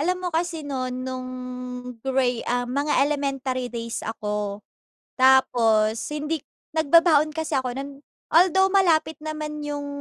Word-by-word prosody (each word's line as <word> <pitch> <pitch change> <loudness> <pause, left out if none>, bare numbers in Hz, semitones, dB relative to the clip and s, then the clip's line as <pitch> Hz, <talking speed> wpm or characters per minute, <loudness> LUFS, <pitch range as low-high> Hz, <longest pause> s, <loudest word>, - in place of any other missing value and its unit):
Alam 360 +4 +1
mo - - +1
kasi 330 -2 -2
no’n 255 -2 -3
nung 255 -1 -5 0.7
gra 265 +1 +1 0.4
um - - -9
mga 285 +2 0
elementary 270 -3 -2
days 230 -1 -5
ako. 210 -2 -4 0.6
Tapos 230 -4 +4
hindi 300 +1 -2 0.3
nagbabaon 315 -1 +4
kasi 320 -1 -3
ako 250 -1 -4
no’n. 275 +1 -5 0.4
Although 380 +3 +5
malapit 325 -5 +3
naman 305 0 -5
yung 290 -1 -4
285 Hz, 125 wpm, -24 LUFS, 255-315 Hz, 0.7 s, Although